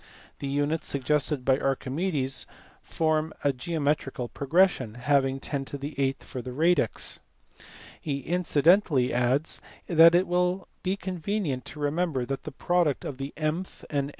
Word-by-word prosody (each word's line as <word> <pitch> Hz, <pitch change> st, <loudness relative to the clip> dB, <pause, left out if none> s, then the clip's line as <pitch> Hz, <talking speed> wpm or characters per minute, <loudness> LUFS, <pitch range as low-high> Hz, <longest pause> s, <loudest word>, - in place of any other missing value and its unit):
The 140 Hz, -, -4 dB
units 145 Hz, +3 st, -1 dB
suggested 145 Hz, 0 st, 0 dB
by 130 Hz, 0 st, +3 dB
Archimedes 135 Hz, 0 st, -1 dB, 0.3 s
form 155 Hz, -1 st, 0 dB
a 140 Hz, -, +3 dB
geometrical 140 Hz, -3 st, -2 dB
progression, 140 Hz, -, +2 dB
having 135 Hz, +1 st, +1 dB
10 135 Hz, -1 st, -3 dB
8 140 Hz, -1 st, -2 dB
for 130 Hz, -, -6 dB
the 125 Hz, -, -7 dB
radix. 155 Hz, -2 st, +1 dB, 0.8 s
He 140 Hz, -3 st, -3 dB
incidentally 165 Hz, -3 st, +3 dB
adds 125 Hz, +5 st, +1 dB, 0.2 s
that 165 Hz, 0 st, +7 dB
it 180 Hz, +2 st, +4 dB
will 180 Hz, +1 st, 0 dB
be 185 Hz, +1 st, 0 dB
convenient 185 Hz, -6 st, -3 dB
to 150 Hz, -, -9 dB
remember 145 Hz, -2 st, 0 dB
that 135 Hz, +2 st, -4 dB
the 155 Hz, -, -5 dB
product 165 Hz, +1 st, +1 dB
of 135 Hz, -2 st, -5 dB
the 135 Hz, +1 st, -4 dB
mth 160 Hz, +4 st, -3 dB
and 140 Hz, -1 st, 0 dB
145 Hz, 135 wpm, -27 LUFS, 135-170 Hz, 0.8 s, that